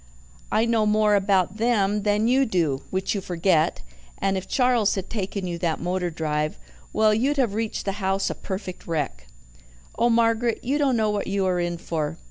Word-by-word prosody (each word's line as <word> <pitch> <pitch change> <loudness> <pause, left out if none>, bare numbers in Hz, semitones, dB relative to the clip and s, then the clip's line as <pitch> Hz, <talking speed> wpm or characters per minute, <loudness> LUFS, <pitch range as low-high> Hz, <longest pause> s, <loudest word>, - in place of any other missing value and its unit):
I 220 - +3
know 225 -2 +2
more 210 0 +3
about 195 -1 +2
them 210 -3 +1
than 210 +2 +1
you 260 +3 +4
do, 165 - 0
which 190 0 -1
you 200 - -2
forget, 175 - +1 0.3
and 195 0 0
if 190 0 -4
Charles 250 -5 +2
had 195 -1 -5
taken 200 -2 -3
you 170 -1 -4
that 165 -3 -1
motor 180 +1 -1
drive 155 -2 -2 0.3
well, 215 -1 +3
you'd 270 +7 +1
have 245 -7 +1
reached 220 0 -3
the 195 - 0
house 195 +1 0
a - - -2
perfect 190 -2 -6
wreck. 145 - -3 0.7
Oh, 235 +1 +4
Margaret, 230 0 +2
you 275 +4 0
don't 270 -4 +2
know 215 -1 +2
what 205 -1 -2
you 195 0 0
are 180 -1 +1
in 175 0 -1
for. 160 -3 -3
200 Hz, 190 wpm, -24 LUFS, 180-225 Hz, 0.7 s, you